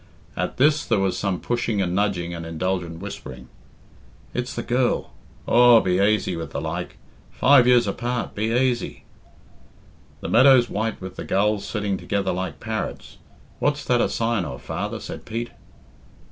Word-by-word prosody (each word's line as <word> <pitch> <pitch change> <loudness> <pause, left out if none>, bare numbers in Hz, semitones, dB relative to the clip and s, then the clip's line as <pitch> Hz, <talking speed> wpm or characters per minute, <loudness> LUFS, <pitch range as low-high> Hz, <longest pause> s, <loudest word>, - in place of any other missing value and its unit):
At - - -3
this 145 +3 +4
there 110 - +1
was 95 -2 +1
some 95 -3 -1
pushing 120 -3 -1
and 90 -2 0
nudging 90 -3 0
and 85 -1 -6
indulgent 85 0 -3
whispering. 65 -11 -8 0.8
"It's 125 +1 -3
the - - -3
girl! 125 0 0 0.3
Aw, 120 -1 +7
be 90 -3 +1
aisy 100 -2 +2
with 80 -2 -5
the - - -4
like! - - -5 0.3
Five 130 -2 +5
years 125 -1 +5
apart, 120 +4 -3
be 110 +2 -1
aisy!" 125 0 0 1.2
"The - - -4
meadow's 130 0 +5
white 110 +1 -2
with 95 0 -8
the - - -5
gulls 105 +1 +1
sitting 105 -3 -2
together 100 +1 -1
like 95 +1 -4
parrots; 110 0 -5 0.4
what's 145 0 0
that 120 -1 +2
a - - +1
sign 115 -3 0
of, 60 -7 -7
father?" - - -4
said - - -8
Pete. 115 +2 -5
105 Hz, 160 wpm, -23 LUFS, 95-120 Hz, 1.2 s, Aw